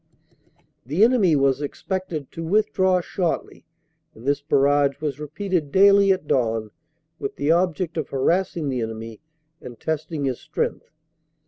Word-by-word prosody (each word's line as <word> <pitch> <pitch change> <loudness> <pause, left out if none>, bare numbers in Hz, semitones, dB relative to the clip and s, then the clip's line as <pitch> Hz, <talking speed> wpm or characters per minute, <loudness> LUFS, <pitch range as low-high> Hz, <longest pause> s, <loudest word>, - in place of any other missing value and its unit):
The 150 - +1
enemy 225 -9 +4
was 135 0 +2
expected 165 0 -4
to 165 - -6
withdraw 185 0 +2
shortly, 175 0 -3 0.5
and 115 - -13
this 140 +1 +1
barrage 140 -1 +2
was 150 -3 -3
repeated 155 0 -2
daily 200 0 +6
at 185 -4 0
dawn 115 -5 0 0.5
with - - -4
the 145 +2 +1
object 175 -1 0
of 155 - -3
harass 170 +8 0
ing 150 -4 -2
the 130 -2 -1
enemy 110 0 -6 0.4
and 120 -2 -10
testing 155 -1 -3
his 130 -3 -2
strength. - - -3
150 Hz, 140 wpm, -23 LUFS, 135-185 Hz, 0.5 s, daily